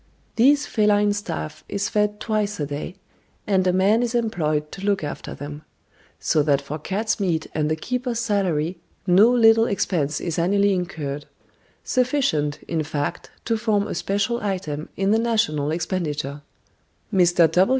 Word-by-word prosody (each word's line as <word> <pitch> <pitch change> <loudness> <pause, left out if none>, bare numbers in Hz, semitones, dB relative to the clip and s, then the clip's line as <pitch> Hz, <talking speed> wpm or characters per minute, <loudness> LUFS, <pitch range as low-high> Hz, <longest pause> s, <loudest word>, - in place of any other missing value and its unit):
This 285 +5 +4
feline 210 -3 +2
staff 160 -6 -5
is 200 0 -1
fed 210 0 0
twice 210 -3 -1
a 145 - 0
day, 145 +5 -5 0.5
and 190 -2 +2
a - - +4
man 195 +5 +3
is 240 0 -1
employed 155 -10 0
to 195 - -8
look 200 -3 +1
after 145 - -5
them; 145 +1 -7 0.6
so 155 - +2
that 145 -2 +2
for 145 +3 -6
cats' 210 +8 -1
meat 170 -5 0
and 155 -1 0
the 155 - +1
keeper's 250 +7 -3
salary 185 -7 0 0.3
no 195 +5 +6
little 225 -2 +5
expense 160 -7 0
is 170 -1 -3
annually 200 +3 +3
incurred; 155 -6 -4 0.6
sufficient, 245 - 0
in 165 -2 -1
fact, 150 +2 -3 0.2
to 230 - +1
form 215 -3 +1
a - - -4
special 205 +5 -1
item 170 -7 -3
in 195 +1 +1
the 220 - +4
national 215 -11 +1
expenditure. 150 -4 -2 0.7
Mr. 175 -1 +4
190 Hz, 150 wpm, -23 LUFS, 155-215 Hz, 0.7 s, no